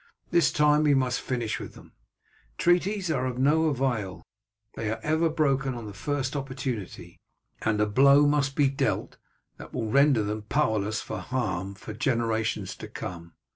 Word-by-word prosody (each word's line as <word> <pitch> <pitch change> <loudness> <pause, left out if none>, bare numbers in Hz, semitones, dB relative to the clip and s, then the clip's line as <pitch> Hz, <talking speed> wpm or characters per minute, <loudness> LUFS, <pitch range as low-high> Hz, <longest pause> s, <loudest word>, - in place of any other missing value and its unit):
This 170 - +4
time 150 0 +4
we 150 -2 +4
must 130 -2 0
finish 120 -4 -2
with - - -9
them; - - -15 0.7
treaties 180 +1 +2
are 130 -4 0
of 125 -1 -4
no 150 +5 +3
avail 120 - -1 0.5
they 110 - -3
are 110 - -3
ever 160 +2 +2
broken 135 -4 +1
on 120 -2 -7
the 105 - -8
first 135 +6 -2
opportunity, 130 -7 -5 0.4
and 110 -1 0
a 105 - +4
blow 140 +7 +5
must 145 -2 +1
be 145 -2 +4
dealt 135 0 -1 0.4
that - - -11
will 110 -1 -2
render 140 -4 +4
them 105 +1 -3
powerless 110 -3 0
for - - -5
harm 100 -7 -3
for 110 +2 -9
generations 115 -2 -1
to - - -8
come. 85 -2 -8
130 Hz, 165 wpm, -27 LUFS, 110-145 Hz, 0.7 s, blow